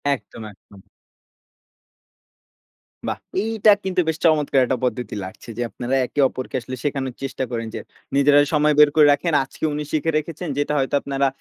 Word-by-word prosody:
একদম, 115 - -12
একদম। 100 0 -19 2.3
বাহ! - - -3 0.2
এইটা 220 -1 +3
কিন্তু 190 -1 -1
বেশ 160 -1 0
চমৎকার 150 -4 +3
একটা 130 - -1
পদ্ধতি 120 -3 -3
লাগছে। 95 +5 -11
যে - - -2
আপনারা 120 +5 -3
একে 145 - -6
অপরকে 130 - -7
আসলে 130 +2 -6
শেখানোর 135 -3 -2
চেষ্টা 135 -1 -3
করেন, 115 -1 -3
যে - - -3 0.4
নিজেরা 145 +1 +5
সময় 150 0 +3
বের 150 -1 +8
করে 150 -2 +7
রাখেন। 165 +3 -1
আজকে 135 - -13
উনি 150 0 -3
শিখে 160 +1 0
রেখেছেন, 165 +3 -4
যেটা 145 +1 0
হয়তো 135 +2 0
আপনারা 140 0 0
140 Hz, 165 wpm, -22 LUFS, 130-155 Hz, 2.3 s, বের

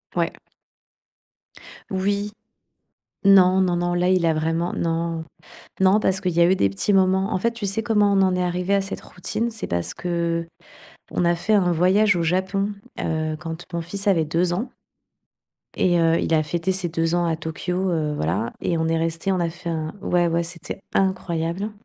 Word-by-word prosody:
Ouais. - - 0 1.6
Oui. 200 +2 -1 0.9
Non, 190 -1 +6
non, 180 -2 +2
non, 175 0 0
là, 175 +1 +1
il 185 -2 +3
a 165 - +4
vraiment 165 +2 -1
non. 165 0 -2 0.6
Non, 190 +3 +5
parce 190 -1 +1
qu'il 180 -4 -1
y 170 - +1
a 170 - +7
eu - - +5
des 100 - +2
petits 100 - -1
moments 190 +1 +3
en - - +1
fait, 235 +5 0
tu 230 -2 -7
sais 200 +3 -1
comment 210 -3 +3
on 195 - +3
en 185 -1 +3
est 180 - 0
arrivés 180 +2 0
à 195 - +2
cette 195 - -5
routine? 220 +6 -3
C'est 220 -1 -5
parce 85 0 -2
qu'on 170 -1 -2 0.8
a 170 0 +3
fait 205 +5 -1
un 185 -4 +3
voyage 185 +4 +3
au 170 - 0
Japon, 190 +4 0 0.3
heu, 155 -1 -1
quand 165 +1 -7
mon 170 - -2
fils 195 +4 -4
avait 165 -5 +3
2 170 +3 0
ans 230 +8 -2 1.1
et 175 -1 +3
heu, 165 0 +3
il 165 - 0
a 155 - +3
fêté 170 +4 -2
ses 185 -2 0
2 165 +1 0
ans 175 0 +2
à 165 - +1
Tokyo, 180 +4 -2
heu, 155 -3 -1
voilà 85 - -1
et 170 - 0
on 160 0 0
est 165 0 +1
restés 165 +3 -1
on 185 - 0
a 170 - +1
fait 170 +1 -6
un 155 +1 -3
ouais, 175 -1 +2
ouais, 170 +1 +1
c'était 170 +2 -7
incroyable 185 0 -1
175 Hz, 195 wpm, -23 LUFS, 165-190 Hz, 1.6 s, a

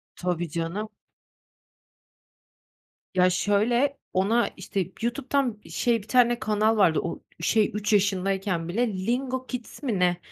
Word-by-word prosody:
Tabii 175 -2 -2
canım. 170 +7 -3 2.2
Ya 185 -1 +4
şöyle, 225 +9 +2 0.2
ona 215 +6 +2
işte, 195 -2 -2 0.2
YouTube'dan 245 -1 -1
şey, 235 -2 +1
1 205 - -16
tane 240 -1 +4
kanal 215 +1 +1
vardı, 180 -6 +4
o - - -4 0.2
şey, 210 +6 +2
3 210 +1 -1
yaşındayken 195 -3 +1
bile, 230 +8 +1 0.2
Lingo 255 +2 -1
Kids 250 +2 -7
mi 230 -9 0
ne, 180 -1 +3
210 Hz, 120 wpm, -26 LUFS, 185-240 Hz, 2.2 s, Ya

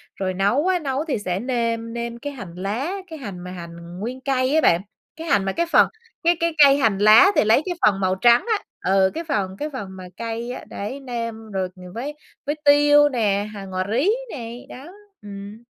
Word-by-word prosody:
Rồi 190 -1 -2
nấu 205 - +1
á, 365 -1 +2
nấu 280 0 -2
thì 280 - 0
sẽ 185 -2 -2
nêm 230 -1 -2
nêm 235 0 -4
cái 290 +3 -6
hành 200 -10 -9
lá, 215 - -3 0.2
cái 320 -3 -9
hành 200 -9 -7
mà 180 +1 -8
hành 170 0 -9
nguyên 250 +5 -5
cây 260 +1 +1
á 315 - +4
bạn, 170 +2 +4 0.3
cái 325 +1 -8
hành 200 -9 +2
mà 195 - 0
cái 340 - 0
phần, - - +6 0.4
cái 345 +1 +4
cái 335 0 0
cây 275 0 +7
hành 220 -8 +2
lá 215 - +7
thì - - +4
lấy 220 +6 +4
cái 360 - -2
phần 200 -2 +3
màu 185 -1 +1
trắng 235 +5 +4
á, 405 - -16 0.3
ừ, 190 -1 +4
cái 330 - -4
phần 195 - -2
cái 300 - -3
phần 205 -7 -5
mà 190 -1 -10
cây 230 +1 -4
á, 250 - -7
đấy, 235 +8 -5
nêm 230 -4 -6
rồi, 190 -2 -1
ừm, 180 0 -12
với 265 +6 -4 0.3
với 295 +2 -1
tiêu 290 0 +6
nè, 210 -5 0
hành, 195 -2 -8
ngò 185 0 -2
rí 260 - +2 0.2
này, 235 -2 -7
đó, 265 +3 -10 0.4
ừm. 205 +2 -9
230 Hz, 220 wpm, -22 LUFS, 195-280 Hz, 0.4 s, cây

